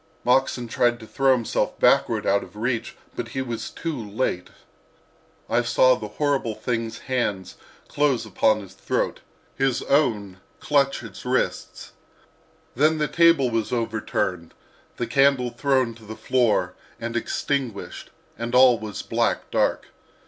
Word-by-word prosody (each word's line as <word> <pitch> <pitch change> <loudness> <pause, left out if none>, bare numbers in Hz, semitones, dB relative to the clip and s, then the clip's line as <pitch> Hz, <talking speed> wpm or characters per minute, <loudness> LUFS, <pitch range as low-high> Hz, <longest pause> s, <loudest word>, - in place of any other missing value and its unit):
Moxon 125 -1 +2
tried 120 +1 +1
to 110 - -10
throw 135 +4 +2
himself 120 -3 -1
backward - - +3
out 100 +1 +3
of - - -12
reach, 115 +2 -2 0.2
but 120 - -4
he 130 +3 -4
was 115 -3 -5
too 165 -2 -4
late: 105 -5 -3 1.0
I 120 - +2
saw 130 +2 +4
the 110 -4 -4
horrible 135 -6 0
thing's 115 -2 -3
hands 110 -8 -2 0.3
close 140 -5 +1
upon 110 +1 +2
his 95 -2 -12
throat, - - -2 0.4
his 135 -2 0
own 110 -10 +1 0.2
clutch 140 -3 +1
its 110 -4 -10
wrists. 125 +1 -2 0.8
Then 155 +5 +3
the 150 -1 0
table 165 -7 +4
was 115 -1 -1
overturned, 110 -7 -2 0.4
the 120 - -1
candle 130 0 +3
thrown 130 -1 +1
to 115 0 -17
the 110 +1 -8
floor 110 -9 +1 0.3
and 115 0 -5
extinguished, 120 -1 -3 0.3
and 115 +1 -2
all 125 -2 +6
was 105 -2 -6
black - - -1
dark. - - 0
120 Hz, 140 wpm, -24 LUFS, 110-135 Hz, 1.0 s, all